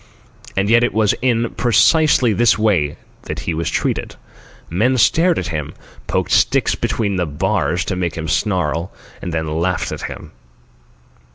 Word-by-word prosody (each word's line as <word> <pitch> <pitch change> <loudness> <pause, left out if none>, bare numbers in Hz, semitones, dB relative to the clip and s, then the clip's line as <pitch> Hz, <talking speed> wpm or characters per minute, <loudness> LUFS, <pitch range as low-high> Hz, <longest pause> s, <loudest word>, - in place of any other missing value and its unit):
And 95 +1 +1
yet 120 +2 +4
it 120 - 0
was 110 -2 +3
in 120 -2 +1
precisely 125 0 +3
this 120 +2 +3
way 90 -10 +1 0.3
that - - -5
he - - -2
was 80 +1 -2
treated. - - -2 0.5
Men 115 +10 +1
stared 165 +8 +3
at 90 - -3
him, 75 -3 -4 0.3
poked - - -1
sticks - - +3
between 100 -4 -1
the 90 -2 -1
bars 90 +1 -1
to 95 - -2
make 90 -3 -2
him 80 0 -5
snarl, 85 -1 -1 0.3
and 90 - -5
then 80 -1 -2
laughed 90 +1 -1
at - - -5
him. - - -7
95 Hz, 160 wpm, -18 LUFS, 85-115 Hz, 0.5 s, yet